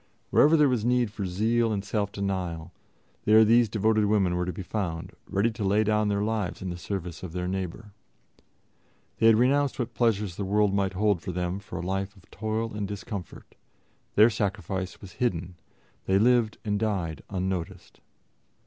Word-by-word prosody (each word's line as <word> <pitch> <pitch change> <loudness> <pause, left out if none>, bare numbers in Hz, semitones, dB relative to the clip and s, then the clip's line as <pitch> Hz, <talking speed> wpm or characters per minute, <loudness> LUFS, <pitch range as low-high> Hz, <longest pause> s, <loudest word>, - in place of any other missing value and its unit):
Wherever 155 +3 +6
there 150 -1 +5
was 125 -5 0
need 120 -2 +2
for 100 -3 -4
zeal 115 +5 +1
and 100 -2 -2
self 100 -2 -1
denial, 90 -4 -3 0.5
there 110 +1 +7
these 115 +1 +4
devoted 110 +1 +2
women 100 -4 +2
were 90 0 -1
to - - -1
be 95 - -7
found, 90 -2 -3 0.2
ready 100 +4 +1
to 110 -1 -5
lay 100 +2 +3
down 105 0 +2
their 100 0 0
lives 110 -3 -2
in 95 - -3
the 90 - -5
service 90 -3 -5
of 90 -3 -7
their 90 0 -2
neighbor. 95 +3 -4 1.3
They 115 - +5
had 115 - +7
renounced 135 +4 +2
what 120 -4 -3
pleasures 105 -6 0
the 100 - -2
world 100 +1 +2
might 100 -1 0
hold 100 -2 +1
for 90 - -4
them 90 +1 -2
for 100 -3 -8
a 85 - -4
life 95 +2 -3
of 95 - -21
toil 110 +1 -3
and 105 -1 -3
discomfort; 100 -2 -7 0.6
their 110 +3 +7
sacrifice 95 -3 -3
was 95 - -10
hidden; 90 -7 -1 0.5
they 95 - +4
lived 115 0 +3
and 105 -1 0
died 90 -9 -2
unnoticed. 95 -3 -4
100 Hz, 180 wpm, -27 LUFS, 95-110 Hz, 1.3 s, there